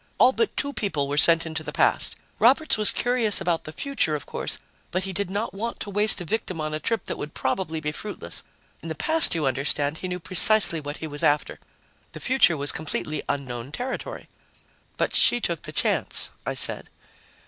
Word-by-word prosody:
All 255 - +6
but 445 - -1
two 285 -1 -1
people 155 - -2
were 145 - -3
sent 165 +2 +7
into 160 0 -4
the - - -6
past. - - +2 0.2
Roberts 275 +6 +4
was 215 -1 +5
curious 240 -4 +3
about 170 -2 -1
the 155 - -7
future, 275 - 0
of 145 - -6
course, - - -4 0.3
but 185 +1 -2
he 190 0 -4
did 190 +1 -2
not 205 +1 -3
want 230 +4 -5
to 205 - -5
waste 210 +1 +1
a 175 - -6
victim 185 -3 -3
on 155 0 -3
a 155 - -2
trip 225 +3 -2
that - - -5
would 150 +1 -7
probably 160 +3 -2
be 150 -1 -3
fruitless. 150 - -6 0.4
In 165 - -8
the 160 - -4
past, 320 - 0
you 160 -3 -1
understand, 140 +3 -1
he 185 - -5
knew 180 0 -4
precisely 185 -1 +4
what 145 0 -6
he - - -6
was 145 -1 -7
after. 145 +1 +1 0.5
The - - -8
future 255 -11 +3
was 145 +1 +2
completely 155 -1 -4
unknown 130 -2 -4
territory." 250 - -6 0.7
"But - - -1
she 240 - +5
took 170 -8 -2
the - - -7
chance," - - +2 0.2
I - - -2
said. - - +2
170 Hz, 205 wpm, -24 LUFS, 150-215 Hz, 0.7 s, sent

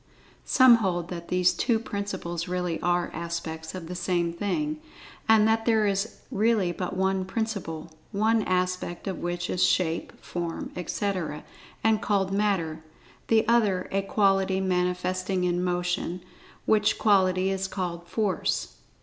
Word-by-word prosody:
Some 255 -3 +7
hold 175 -5 -1
that 170 -1 -6
these 180 0 +3
two 235 - +1
principles 190 -6 -4
really 180 -2 -2
are 175 0 +1
aspects 165 0 -5
of 180 -3 -6
the 180 - -5
same 175 -1 0
thing, 300 - -2 0.5
and 220 -1 +6
that 225 0 +2
there 220 -2 +4
is 200 +2 -1
really 215 -5 +2
but 180 +1 -4
one 190 0 +1
Principle, 185 -6 -4 0.2
one 220 +2 +2
aspect 180 -1 -1
of 190 - -3
which 175 0 -2
is 180 - 0
shape, 165 -2 +1
form, 170 -1 -5
etc., 180 -3 -3 0.4
and 220 -1 +3
called 195 -3 +1
Matter; 180 -6 0 0.4
the 220 -1 +3
other 210 -6 +2
a 195 - +1
quality 195 -1 +2
manifesting 185 0 0
in 180 0 +1
Motion, 180 0 -1 0.4
which 215 0 +3
quality 190 -2 +3
is 190 0 -1
called 175 -3 -4
Force. 205 -1 -1
185 Hz, 140 wpm, -27 LUFS, 175-205 Hz, 0.5 s, Some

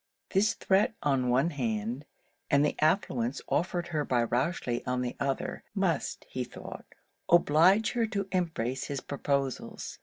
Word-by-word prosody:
This 205 +3 +3
threat 200 +3 +2
on 135 -3 +2
one 135 +7 +3
hand, 120 0 -2 0.4
and 145 +1 +4
the 150 - 0
affluence 140 - +1
offered 175 +2 -1
her 155 -3 0
by 120 -4 +1
Rochely 125 0 -1
on 125 0 0
the 120 - -3
other, 140 -1 -2
must, - - -1
he - - -3
thought, - - -9 0.4
oblige 175 +5 +5
her 230 -2 +1
to 200 -3 -2
embrace 140 -9 -1
his 140 -1 -3
proposals. 140 -2 -3
145 Hz, 145 wpm, -29 LUFS, 125-175 Hz, 0.4 s, oblige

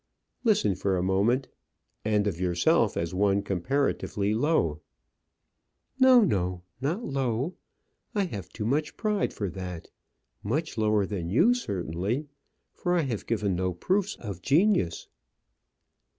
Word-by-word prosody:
"Listen 215 - +3
for 95 0 0
a 90 - 0
moment 105 +8 +2 0.6
and 105 -1 +2
of 90 -5 -2
yourself 90 -2 +2
as 85 +1 -2
one 100 +1 +2
comparatively 105 0 0
low." 110 - +1 1.2
"No, 260 -2 +7
no, 90 - 0 0.2
not 165 - -1
low; 135 - -1 0.6
I 205 - +2
have 100 - -6
too 105 - -5
much 145 +6 -1
pride 210 -2 0
for 100 - -3
that; 90 -3 -7 0.5
much 150 +10 -2
lower 105 -2 +2
than 95 -5 -4
you, 170 - +5
certainly, 100 - -2 0.5
for 175 0 -1
I 175 - +3
have 125 -8 -3
given 105 -5 0
no 90 0 -1
proofs 195 - 0
of 100 -6 -7
genius." 150 - +2
105 Hz, 130 wpm, -27 LUFS, 95-150 Hz, 1.2 s, No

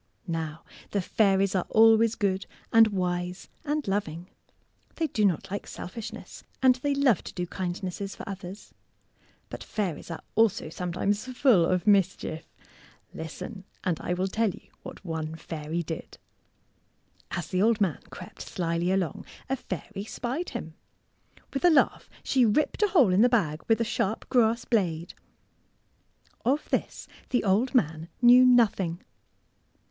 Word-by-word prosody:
Now 160 -3 -4 0.3
the 200 - 0
fairies 195 0 +2
are 185 - 0
always 225 0 +5
good 195 -2 -1 0.3
and 225 -1 +8
wise 180 -2 -3
and 300 -3 -2
loving. 180 -3 -3 0.6
They 330 - 0
do 220 -8 -1
not 185 -3 +1
like 200 - -4
selfishness, 220 +5 -8 0.2
and 260 -1 +6
they 280 +2 -1
love 270 - +3
to - - -7
do 180 - -2
kindnesses 185 +2 -4
for - - -9
others. 195 0 -8 0.8
But - - -6
fairies 190 -8 -3
are 165 - -6
also 225 -7 +2
sometimes 180 +5 -2
full 245 -9 +4
of 185 +1 0
mischief. 190 -5 +1 0.7
Listen, 185 +5 -7 0.2
and 175 -4 0
I 180 - -1
will 185 +1 0
tell 220 +3 +1
you - - -11
what - - -10
one 160 -2 -4
fairy 160 +1 -4
did! 160 0 -7 1.1
As 175 -3 -4
the 185 - 0
old 225 +1 +3
man 190 -7 +1
crept - - -10
slyly 170 +1 -1
along, 185 -6 -1 0.3
a 270 - +1
fairy 195 - -6
spied 255 +10 -4
him. 165 -10 -6 0.8
With 275 - -2
a 355 - +7
laugh 310 -5 +2
she 260 -2 +3
ripped 240 - +1
a 420 - +5
hole 275 - +4
in 190 - +4
the 245 - +6
bag 165 -11 +1
with 225 0 +3
a - - +2
sharp 220 -1 -2
grass 235 -2 +3
blade. 175 -7 0 1.3
Of 275 +6 +1
this - - -2 0.2
the 250 - +1
old 215 +7 +2
man 160 -6 +1
knew 245 +1 +8
nothing. 210 -9 +3
195 Hz, 150 wpm, -27 LUFS, 175-230 Hz, 1.3 s, and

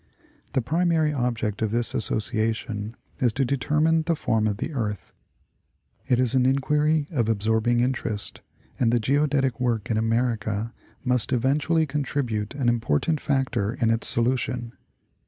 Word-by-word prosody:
The 130 - +1
primary 160 +1 +1
object 120 -6 -1
of 110 - +1
this 120 +3 0
Association 110 -2 -1 0.2
is 125 -4 +3
to 135 +3 +1
determine 150 +5 +2
the 165 +1 0
form 110 -7 +1
of 105 -2 -1
the 160 - -4
earth. 105 -6 -4 0.9
It 125 - +3
is 125 -2 +2
an 130 -1 +3
inquiry 150 +3 +2
of 120 -8 0
absorbing 110 +2 +2
interest, 120 -5 -2 0.4
and 115 -2 +3
the 120 - +3
geodetic 135 +1 +1
work 120 -2 -1
in 110 - +1
America 115 -1 0 0.3
must 125 -3 +1
eventually 145 +6 +2
contribute 130 -6 -2
an 135 -3 -1
important 120 - +1
factor 125 -6 0
in 115 -2 +1
its 115 0 0
solution. 120 0 -1
125 Hz, 140 wpm, -25 LUFS, 110-140 Hz, 0.9 s, is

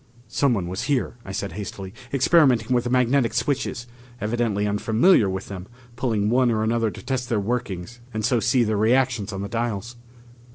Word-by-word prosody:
"Someone 115 -11 +1
was 95 +2 -4
here," 135 -4 -1
I 100 - -8
said 100 +1 -3
hastily, 100 -2 -7 0.2
"experimenting 130 -4 +3
with 120 -1 +1
the - - -1
magnetic 125 -1 +2
switches. 125 -1 -1 0.3
Evidently 110 -2 0
unfamiliar 110 - +3
with 95 +1 -4
them 95 -1 -7 0.3
pulling 115 -5 0
one 125 0 +3
or 110 -2 +1
another 115 0 +1
to - - -10
test 130 -1 -2
their 115 -4 +1
workings 115 -1 -3
and 110 -2 -2
so 120 -1 +2
see 120 +3 +3
their 110 -2 0
reactions 115 -1 +2
on 100 -1 -4
the - - -3
dials." 115 +1 -3
115 Hz, 175 wpm, -23 LUFS, 105-125 Hz, 0.3 s, experimenting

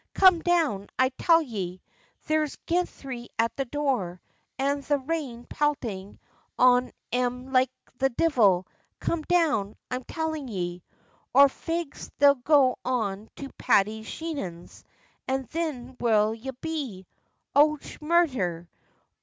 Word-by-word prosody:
Come 370 -3 +7
down, 315 - +1
I 260 0 +4
tell 330 +5 +3
ye! 190 - -5 0.5
There's 310 -2 0
ginthry 275 -8 -2
at 230 0 +1
the 275 - -2
door, 245 -10 -1 0.4
an' 280 +1 0
the 290 +1 +1
rain 265 -4 -4
peltin' 230 -10 -2 0.4
on 250 0 +5 0.2
em 250 +1 -1
like 255 0 +4 0.3
the 270 0 +3
divil. 230 - +3 0.3
Come 335 - -1
down, 305 - +1 0.2
I'm 255 0 -2
tellin' 315 -3 -3
ye! 180 -5 -4 0.5
Or 280 +1 +8
fegs 330 +1 -5
they'll 285 0 +7
go 270 -1 +3
on 220 -4 -2
to 275 - -7
Paddy 220 -2 +3
Sheehan's, 220 - -6 0.4
an' 265 0 0
thin 265 -5 -4
where'll 220 -2 +3
ye 230 +4 -7
be? 275 -13 -4 0.5
Och, 300 +1 +4 0.2
murdher! 255 - +1
260 Hz, 120 wpm, -27 LUFS, 220-300 Hz, 0.5 s, Or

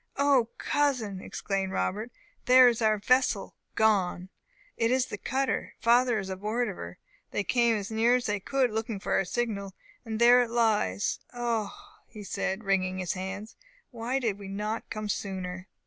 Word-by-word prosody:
"O, 275 -4 +3
cousin!" 250 -10 0
exclaimed 195 -1 -3
Robert, 210 - -2 0.3
"there 255 0 +8
is 235 -1 +1
our 215 -1 +3
vessel 250 -1 +1 0.2
gone! 190 -4 +2 0.5
It 230 - +1
is 255 0 +2
the 205 - -6
cutter! 265 +5 -2
Father 240 0 +4
is 195 -2 -3
aboard 210 +5 -1
of 195 - -6
her! 85 - -8 0.3
They 205 - -1
came 235 +2 +2
as 210 +1 -4
near 230 +3 +3
as 250 0 -1
they 210 -1 -1
could, 260 +4 0
looking 220 -1 -3
for 200 - -5
our 195 - +2
signal 200 -2 -3 0.3
and 225 -2 -4
there 240 +1 +7
it 240 - -1
lies! 215 - +1 0.2
Oh 235 -3 -1 0.4
h!" 210 -1 -8
said 190 +1 -2
he, - - -17
wringing 185 -1 +1
his 180 -2 -2
hands, 195 +3 -6 0.4
"why 240 +2 -2
did 225 -6 -1
we 200 - -8
not 210 +3 -4
come 215 -1 -4
sooner?" 185 -2 -4
220 Hz, 175 wpm, -28 LUFS, 195-240 Hz, 0.5 s, there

